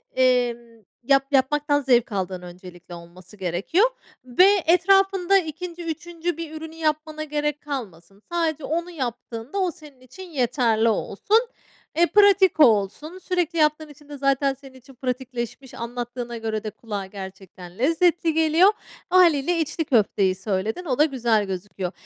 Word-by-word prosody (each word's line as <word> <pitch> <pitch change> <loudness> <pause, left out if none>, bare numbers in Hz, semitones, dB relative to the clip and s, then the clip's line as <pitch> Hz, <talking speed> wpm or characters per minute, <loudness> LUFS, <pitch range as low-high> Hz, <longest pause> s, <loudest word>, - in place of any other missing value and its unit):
emm, 240 -3 0 0.2
yap 275 +1 +3
yapmaktan 290 +2 +2
zevk 245 -4 +2
aldığın 185 -2 -3
öncelikle 180 0 -12
olması 175 +4 -14
gerekiyor 195 - +1 0.4
ve 310 +11 +5 0.2
etrafında 390 +2 +4
2'nci 345 0 -5
3'üncü 340 +1 -4
bir 330 -2 -6
ürünü 320 0 -9
yapmana 310 -1 -2
gerek 295 -1 -2
kalmasın. 200 - -7
Sadece 320 -4 -1
onu 340 +4 -2
yaptığında 245 - -5
o 370 -2 +1
senin 295 -4 -16
için 365 +9 -12
yeterli 240 -5 +1
olsun. 225 - +1 0.6
Eee, 345 - +5
pratik 400 -3 +4
olsun. 245 - +3
Sürekli 355 -3 -2
yaptığın 305 0 +1
için 295 0 -17
de 290 - -8
zaten 275 0 +1
senin 270 0 -15
için 260 +2 -17
pratikleşmiş. 250 0 -5
Anlattığına 240 0 -5
göre 220 -1 -3
de 215 - -3
kulağa 205 -3 -6
gerçekten 190 -2 -11
lezzetli 330 +4 +2
geliyor. 320 +4 +4 0.4
Hâliyle 345 -2 +4
içli 320 +1 -2
köfteyi 200 -7 +2
söyledin. 205 - -3
O 260 -6 -1
da 300 - +5
güzel 235 -7 +1
gözüküyor. 185 -1 -5
270 Hz, 140 wpm, -23 LUFS, 220-325 Hz, 0.6 s, ve